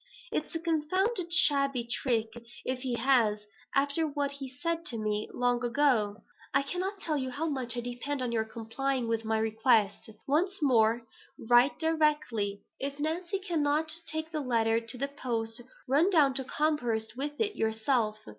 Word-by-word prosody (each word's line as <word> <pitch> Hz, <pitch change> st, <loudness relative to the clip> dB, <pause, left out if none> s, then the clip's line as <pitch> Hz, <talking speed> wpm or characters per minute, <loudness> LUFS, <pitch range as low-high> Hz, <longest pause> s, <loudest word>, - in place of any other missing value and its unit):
"It's -, -, -3 dB
a -, -, 0 dB
confounded 340 Hz, +4 st, 0 dB
shabby 275 Hz, -6 st, +4 dB
trick 235 Hz, -2 st, 0 dB, 0.4 s
if 255 Hz, 0 st, -1 dB
he 250 Hz, -2 st, -2 dB
has, 230 Hz, -4 st, +2 dB, 0.3 s
after 285 Hz, +3 st, +2 dB
what 285 Hz, -1 st, -1 dB
he 280 Hz, -1 st, -7 dB
said 330 Hz, +5 st, -2 dB
to 235 Hz, -, -2 dB
me 215 Hz, -1 st, -1 dB
long 245 Hz, 0 st, +1 dB
ago. 235 Hz, -5 st, +2 dB, 0.3 s
I 275 Hz, -, +4 dB
cannot 365 Hz, +7 st, -3 dB
tell 310 Hz, -5 st, -1 dB
you 260 Hz, -1 st, -2 dB
how 285 Hz, +5 st, -3 dB
much 255 Hz, -5 st, -2 dB
I -, -, -1 dB
depend 245 Hz, +4 st, -4 dB
on 245 Hz, -, -2 dB
your 225 Hz, -1 st, +1 dB
complying 235 Hz, +3 st, -2 dB
with 225 Hz, 0 st, 0 dB
my 220 Hz, 0 st, +1 dB
request. 220 Hz, -1 st, +2 dB, 0.2 s
Once 355 Hz, +8 st, +1 dB
more, 235 Hz, -5 st, +3 dB, 0.4 s
write 245 Hz, +4 st, +5 dB
directly. 300 Hz, -11 st, +1 dB, 0.2 s
If 280 Hz, +1 st, -4 dB
Nancy 340 Hz, +6 st, -1 dB
cannot 315 Hz, -5 st, 0 dB, 0.2 s
take 315 Hz, +1 st, -3 dB
the 310 Hz, -2 st, -2 dB
letter 230 Hz, -3 st, +2 dB
to 230 Hz, +1 st, -5 dB
the 275 Hz, +3 st, -1 dB
post, 235 Hz, -4 st, -3 dB, 0.3 s
run 295 Hz, +8 st, +4 dB
down 300 Hz, -8 st, +4 dB
to 265 Hz, 0 st, -3 dB
Combehurst 245 Hz, -8 st, -1 dB
with 290 Hz, +3 st, -4 dB
it 420 Hz, -2 st, 0 dB
yourself. 220 Hz, -1 st, 0 dB
265 Hz, 165 wpm, -30 LUFS, 230-300 Hz, 0.4 s, write